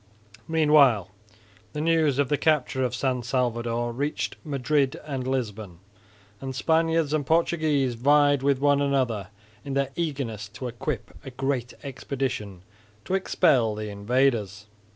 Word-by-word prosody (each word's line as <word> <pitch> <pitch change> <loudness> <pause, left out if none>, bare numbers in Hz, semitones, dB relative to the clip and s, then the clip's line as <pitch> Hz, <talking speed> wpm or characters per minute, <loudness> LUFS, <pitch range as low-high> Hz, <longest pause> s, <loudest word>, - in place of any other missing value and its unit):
Meanwhile 145 - +4 0.6
the 150 - -4
news 160 -3 +2
of 145 -1 +2
the 145 - +1
capture 140 -4 +1
of 125 -1 -1
San 130 -1 -1
Salvador 120 -1 -1
reached 145 +5 -2
Madrid 140 -1 0
and 135 -4 -4
Lisbon; 110 -8 -3 0.6
and 130 -1 -6
Spaniards 160 +1 +1
and 155 -2 +1
Portuguese 155 -4 +1
vied 145 +3 +3
with 140 0 +2
one 145 +1 +3
another 130 -8 0 0.4
in 140 -2 -5
their 140 -1 0
eagerness 135 -11 -3
to 130 - -5
equip 120 0 -5
a 135 - -7
great 130 -1 -3
expedition 125 -8 -4 0.4
to - - -3
expel 140 - +2
the 105 0 -5
invaders. 105 -1 0
135 Hz, 130 wpm, -25 LUFS, 120-145 Hz, 0.6 s, Meanwhile